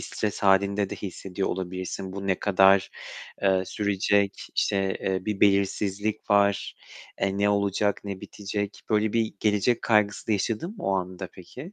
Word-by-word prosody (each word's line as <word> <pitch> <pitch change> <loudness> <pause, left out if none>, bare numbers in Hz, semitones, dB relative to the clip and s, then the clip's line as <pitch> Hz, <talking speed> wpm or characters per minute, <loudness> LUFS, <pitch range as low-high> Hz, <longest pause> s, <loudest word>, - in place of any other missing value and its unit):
stres 105 -1 -3
hâlinde 100 0 +3
de - - -4
hissediyor 95 0 -4
olabilirsin. 95 +1 -4
Bu 100 0 -5
ne 95 -2 +1
kadar, 95 -1 +4 0.5
eee, 95 -1 +3
sürecek? 100 0 0
İşte, 95 -1 +1
eee, 95 -1 -1
bir 105 -2 -3
belirsizlik 100 +2 +1
var. 100 -1 +2 0.4
E, 95 0 0
ne 100 0 +3
olacak, 100 0 +1
ne 100 -2 -5
bitecek? 100 0 -5
Böyle 105 0 +2
bir 115 -1 0
gelecek 105 +3 +2
kaygısı 105 -3 +2
da - - +3
yaşadın 110 - -1
mı 185 - -8
o 95 - +1
anda 95 0 -4
peki? 130 - -11
100 Hz, 155 wpm, -26 LUFS, 95-105 Hz, 0.5 s, kadar